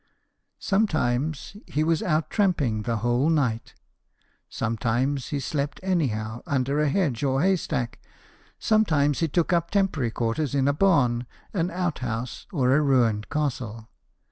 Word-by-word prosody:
Sometimes 155 - 0
he 150 - 0
was 160 0 +1
out 155 -2 0
tramping 150 - +1
the 115 +2 -1
whole 120 +5 +2
night; 125 -8 0 0.7
sometimes 120 +5 -1
he 145 - -2
slept 140 +1 -3
anyhow, 120 - -1
under 140 +1 0
a 150 -1 +2
hedge 145 - 0
or 135 +1 +1
haystack; 155 -10 0 0.6
sometimes 155 -10 +2
he 165 - +1
took 170 +3 +1
up 170 -1 +1
temporary 185 - +1
quarters 120 +6 -1
in 135 -1 +2
a 140 - +3
barn, 135 -9 +2 0.3
an 175 -3 0
outhouse, 130 -10 -3
or 130 -5 +2
a 150 - +4
ruined 120 -7 +2
castle. 120 -7 -3
140 Hz, 135 wpm, -25 LUFS, 120-165 Hz, 0.7 s, a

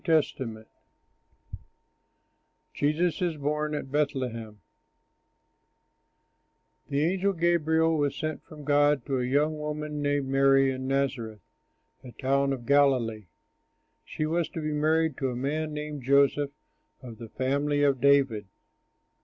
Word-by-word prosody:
L. 160 -1 +4
Taylor] 110 -4 -7 2.1
JESUS 155 +4 0
IS 170 -3 -1
BORN 150 +1 -1
AT 135 -2 -6
BETHLEHEM 125 -7 -2 2.3
The 140 +1 +1
angel 190 +3 +1
Gabriel 165 -2 +2
was 145 -1 0
sent 155 0 -4
from 155 -4 -12
God 145 -2 +2
to 135 -2 -1
a - - -1
young 150 +4 +1
woman 150 0 -4
named 145 -1 0
Mary 135 0 +4
in 130 0 -5
Nazareth, 130 -6 -2 0.6
a 125 - -10
town 140 +1 +1
of 125 -3 -4
Galilee. 125 -7 +2 0.8
She 155 - -4
was 165 0 -1
to - - -6
be 155 0 -2
married 155 0 +1
to 135 - -1
a 125 - -4
man 150 +5 -2
named 150 -1 -5
Joseph 140 +2 +3 0.5
of 115 -3 -10
the 115 -2 -9
family 145 +4 0
of 140 -3 +2
David. 135 -7 +3
145 Hz, 130 wpm, -27 LUFS, 130-150 Hz, 2.3 s, L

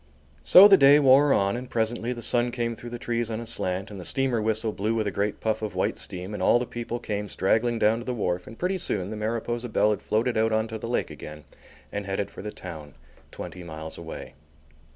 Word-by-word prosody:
So 185 - +9
the 195 -1 +7
day 140 -1 +7
wore 140 +1 +5
on 100 -2 +2
and 125 +1 -6
presently 115 +1 -1
the 120 -2 -5
sun 120 +1 +2
came 115 -1 -2
through 120 - -9
the 120 - -6
trees 120 -2 -2
on 110 0 -3
a 115 - -6
slant 95 -3 -2
and 100 - -8
the - - -7
steamer 130 +1 +1
whistle 110 +1 0
blew 105 +3 -1
with 110 -1 0
a 100 - -1
great 100 +1 -2
puff 110 -1 -1
of 105 -4 -4
white 90 - 0
steam 90 +3 -5
and 105 - -5
all 95 - +5
the 125 - -2
people 120 0 -5
came 105 -3 -4
straggling 115 +6 +1
down 110 +1 +2
to 120 - -8
the 125 - -2
wharf 90 -5 -2
and 115 - -11
pretty 185 +1 -1
soon 95 - -2
the - - -4
Mariposa 115 +2 -3
Belle 105 -1 +3
had 105 - -2
floated 115 +3 0
out 110 +1 +2
on 110 0 +1
to 110 -1 -5
the 115 - -6
lake 120 - -1
again 75 0 -10 0.5
and 100 -1 -4
headed 95 +1 -2
for - - -9
the 105 - -5
town, 80 -8 -9 0.3
twenty 90 - -8
miles 80 -2 -7
away. 85 -1 -8
110 Hz, 240 wpm, -26 LUFS, 100-120 Hz, 0.5 s, So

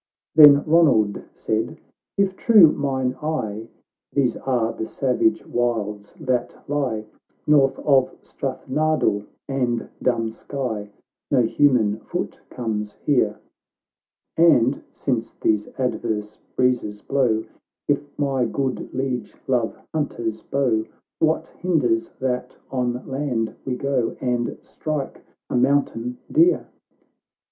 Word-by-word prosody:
Then 145 -2 +9
Ronald 145 -11 +4
said, 110 +1 -2 0.2
— - - -66
" - - -67
If 195 -1 +2
true 205 -10 +7
mine 130 -3 -1
eye, 115 -9 -3 0.4
These 130 -5 +1
are 120 -4 0
the 110 - -4
savage 165 +8 +1
wilds 105 -2 -2
that 130 -5 -1
lie 130 -7 -1 0.4
North 135 -3 +4
of 135 -3 +3
Strathnardill 135 -5 -1 0.2
and 125 -4 -1
Dunskye 115 -1 -2
;h - - -20 0.4
No 125 - +4
human 115 -4 +3
foot - - -5
comes 105 -3 -3
here, 140 -4 +1 1.0
And, 140 -6 +4
since 115 -4 -2
these 105 -1 0
adverse 110 -5 -2 0.2
breezes 120 -5 0
blow, 125 -6 +1 0.4
If 145 0 +2
my 135 -3 +1
good 130 +2 -2
Liege 130 -3 -2
love 125 -4 0 0.2
hunter's 115 -8 -2
bow, 125 -6 +1 0.4
"VYhat 160 0 +2
hinders 130 -11 0
that 125 -1 -2
on 125 -1 -1
land 130 -5 -2
we 130 - -1
go, 130 -3 -1
And 120 -2 -1
strike 150 -3 -4 0.3
a - - 0
mountain 125 -2 +1
deer 335 +4 +4
125 Hz, 115 wpm, -23 LUFS, 115-140 Hz, 1.0 s, Then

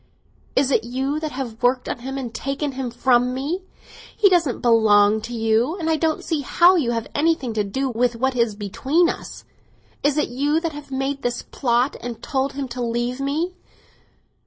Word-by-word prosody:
"Is 270 0 +3
it 225 - +3
you 265 +5 -2
that 310 -1 -4
have 250 -3 -5
worked 250 +1 +2
on - - -3
him 265 +3 -5
and 245 -4 -5
taken 275 +4 -3
him 260 -1 -4
from 245 +1 +2
me? 300 +8 -2 0.6
He 405 - +6
doesn't 335 -9 +2
belong 220 -2 +4
to 235 +3 -7
you, 225 - +1
and 325 -3 -1
I - - +3
don't 315 0 0
see 320 -4 -1
how 345 +7 +5
you 295 -9 +1
have 230 -1 -1
anything 290 -6 +1
to 215 -1 0
do 265 +8 -2
with 245 -1 0
what 260 +2 0
is 230 -3 +1
between 270 - +1
us! - - -7 0.6
Is 290 +1 +1
it 300 - +1
you 290 +5 +1
that 330 -1 -2
have 295 -1 -10
made 270 +1 -2
this 245 0 -2
plot 245 +1 0
and 240 -2 -6
told 270 -1 -1
him 275 -1 -4
to 245 +1 -5
leave 240 +2 -1
me? 310 +6 -1
265 Hz, 195 wpm, -22 LUFS, 235-290 Hz, 0.6 s, He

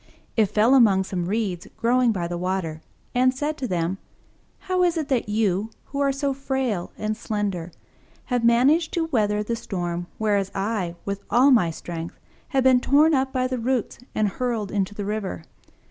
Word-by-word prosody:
It 220 -2 +4
fell 220 +6 +3
among 210 -8 +5
some 185 -2 -3
Reeds 200 -3 -2
growing 245 +1 +3
by 180 -5 -2
the 175 - -4
water, 180 -4 -2 0.3
and 255 +1 +4
said 295 +3 -2
to 260 - -2
them, 180 0 -1 0.6
"How 370 -1 0
is 350 -1 +2
it 310 -3 -2
that 250 -6 0
you, 210 -1 +1 0.2
who 280 - -5
are 280 -1 +3
so 275 0 -1
frail 265 -8 -2
and 215 0 -2
slender, 205 -6 -3 0.5
have 245 -2 -1
managed 265 +8 +4
to 335 -2 +1
weather 210 -3 +1
the 230 +2 -2
storm, 175 -5 -4
whereas 205 -3 +1
I, 195 -3 -2
with 200 0 -3
all 260 +4 +5
my 220 -10 +4
strength, 165 0 -6 0.3
have 270 -3 +1
been 260 -1 +6
torn 295 +5 +4
up 265 -1 +1
by 255 -1 0
the 255 -1 -2
roots 245 0 -1 0.2
and 215 -1 +2
hurled 225 -1 -2
into 200 0 -1
the 205 - -4
river?" 200 - -3
220 Hz, 180 wpm, -24 LUFS, 190-260 Hz, 0.6 s, been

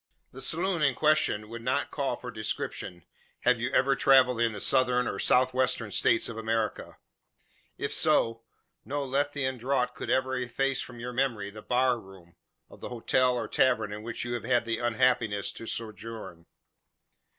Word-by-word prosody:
The 130 - -10
saloon 170 +2 0
in 135 -4 +3
question 155 -9 +2
would 115 +1 -8
not 130 +4 -1
call 140 -2 -1
for 125 - -8
description, 110 -5 -5 0.4
had 125 -1 +3
you 120 +3 -2
ever 135 0 +3
travelled 125 -4 +4
in 115 -1 +3
the 105 - -7
Southern, 125 +1 +3
or 100 - -3
South 130 +4 +3
Western, 125 -4 0
States 115 - +3
of 115 - -6
America. 110 -1 -2 0.8
If - - -3
so, 115 0 +2 0.4
no 145 +1 -3
Lethean 135 -1 -1
draught 125 0 0
could - - -7
ever 130 0 +1
efface 130 +2 -1
from 120 -1 -9
your 125 +1 -5
memory 120 -6 -1
the 110 +1 -10
"bar 125 +1 +1
room" 95 -4 -16 0.3
of - - -16
the - - -7
hotel 125 +1 +1
or 120 - -3
tavern 110 -5 +1
in 105 - -6
which 115 +1 -5
you 120 - -3
have 120 - -3
had 120 -2 +1
the 115 -1 -2
unhappiness 120 -3 +1
to 115 - -9
sojourn. 110 -6 -6
125 Hz, 175 wpm, -28 LUFS, 115-130 Hz, 0.8 s, travelled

